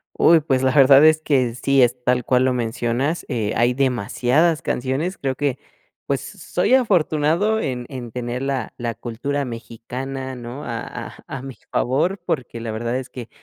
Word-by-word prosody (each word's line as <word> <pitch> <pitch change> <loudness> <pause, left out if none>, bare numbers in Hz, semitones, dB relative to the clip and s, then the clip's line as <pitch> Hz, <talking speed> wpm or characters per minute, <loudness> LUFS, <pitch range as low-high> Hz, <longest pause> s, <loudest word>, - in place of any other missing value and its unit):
Uy, 165 -1 +6
pues 135 -4 0
la 130 - +3
verdad 135 0 +7
es 155 0 +5
que 130 -6 +1
sí 135 +1 +3
es 125 +1 +2
tal 125 -1 +2
cual 125 +1 +3
lo 130 - +2
mencionas. 120 +5 -1
Eh, 110 -6 -1
hay 120 +1 +3
demasiadas 130 +5 +1
canciones 135 +9 -2
creo 135 -1 -1
que 140 -2 -1 0.5
pues, - - -3
s - - -19
soy - - +3
afortunado 190 - +2
en 125 - -3
en 125 -4 -7
tener 120 +2 -4
la 135 -1 -2
la 120 -1 -3
cultura 140 +5 -3
mexicana, 125 +3 -6
¿no? 125 +3 -8
a 115 -1 -3
a - - -8
a 135 - -6
mi 135 -2 -8
favor, 155 +10 +1
porque 125 -7 -3
la 115 -1 -4
verdad 115 +2 -2
es 130 0 -5
que 120 -3 -8
130 Hz, 180 wpm, -21 LUFS, 120-145 Hz, 0.5 s, verdad